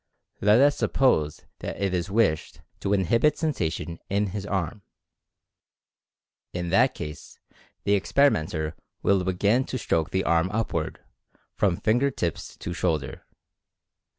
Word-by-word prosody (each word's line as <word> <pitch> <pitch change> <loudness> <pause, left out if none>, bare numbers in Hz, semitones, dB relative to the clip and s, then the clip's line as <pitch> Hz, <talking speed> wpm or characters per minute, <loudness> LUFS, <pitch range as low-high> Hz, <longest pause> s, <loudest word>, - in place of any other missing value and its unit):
Let 105 +3 +5
us 145 +1 +5
suppose 80 - +1
that - - -5
it 100 -2 0
is 90 +1 -1
wished 100 -7 +1 0.2
to 100 - -2
inhibit 115 - +3
sensation 85 - -2
in 100 0 0
his 100 -1 -4
arm. 95 0 -2 1.7
In 85 -1 -3
that 120 +8 +4
case 75 0 -8 0.5
the 100 - +2
experimenter 85 - +1 0.3
will 100 -2 +3
begin 100 +7 +2
to 130 - -3
stroke 80 -9 0
the 95 0 0
arm 85 +2 +2
upward, 100 -6 -2 0.5
from 95 -4 +1
finger 120 +6 +2
tips 85 - -4
to - - -5
shoulder. 70 -5 -2
95 Hz, 125 wpm, -26 LUFS, 85-110 Hz, 1.7 s, Let